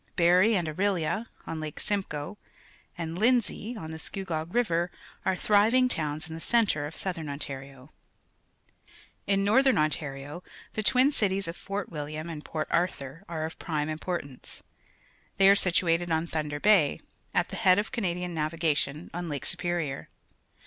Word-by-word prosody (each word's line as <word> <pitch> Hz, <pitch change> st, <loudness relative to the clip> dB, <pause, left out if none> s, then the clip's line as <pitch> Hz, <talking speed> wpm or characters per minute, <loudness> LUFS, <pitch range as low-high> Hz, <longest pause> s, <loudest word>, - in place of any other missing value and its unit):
Barrie 180 Hz, +6 st, +5 dB
and 175 Hz, -4 st, 0 dB
Orillia, 195 Hz, +5 st, 0 dB, 0.2 s
on 160 Hz, -, -4 dB
Lake 155 Hz, -1 st, -5 dB
Simcoe, 190 Hz, -2 st, -3 dB, 0.6 s
and 165 Hz, +1 st, -4 dB
Lindsay, 235 Hz, 0 st, +1 dB
on 160 Hz, -6 st, -6 dB
the 160 Hz, -, -7 dB
Scugog 170 Hz, -2 st, -4 dB
River, 175 Hz, -8 st, +2 dB, 0.4 s
are 190 Hz, -, +2 dB
thriving 215 Hz, +7 st, +4 dB
towns 155 Hz, -8 st, -2 dB
in 160 Hz, -, -8 dB
the 165 Hz, -, -7 dB
centre 205 Hz, -11 st, +2 dB
of 155 Hz, -, -10 dB
Southern 170 Hz, -5 st, -3 dB
OMarioZ 135 Hz, -1 st, -7 dB, 1.4 s
In 195 Hz, 0 st, +2 dB
Northern 260 Hz, +6 st, +4 dB
Ontario 150 Hz, 0 st, -2 dB, 0.3 s
the 215 Hz, -, -1 dB
twin 255 Hz, +5 st, +5 dB
cities 195 Hz, -6 st, +1 dB
o£ 165 Hz, -, -3 dB
Fort 200 Hz, +2 st, -5 dB
Wilhwn 155 Hz, +1 st, -5 dB
and_ 155 Hz, -2 st, -6 dB
Port_jiri}mr 155 Hz, -2 st, -2 dB
are 160 Hz, -2 st, -2 dB
of 160 Hz, -, -7 dB
prime 150 Hz, -3 st, -2 dB
importance. 155 Hz, -4 st, -5 dB, 0.7 s
They 195 Hz, -, +6 dB
are 200 Hz, -, +8 dB
situated 175 Hz, -2 st, +3 dB
on 160 Hz, 0 st, +1 dB
Thunder 150 Hz, -3 st, -3 dB
Bay, 190 Hz, -6 st, +4 dB, 0.3 s
at -, -, +1 dB
the -, -, -5 dB
head 185 Hz, -1 st, +5 dB
x>f 210 Hz, +2 st, -1 dB
Canadian 180 Hz, -4 st, -2 dB
naAdgation^xm 160 Hz, +1 st, -1 dB
Lake 145 Hz, -2 st, -4 dB
Superior. 175 Hz, -5 st, -1 dB
170 Hz, 145 wpm, -28 LUFS, 155-195 Hz, 1.4 s, are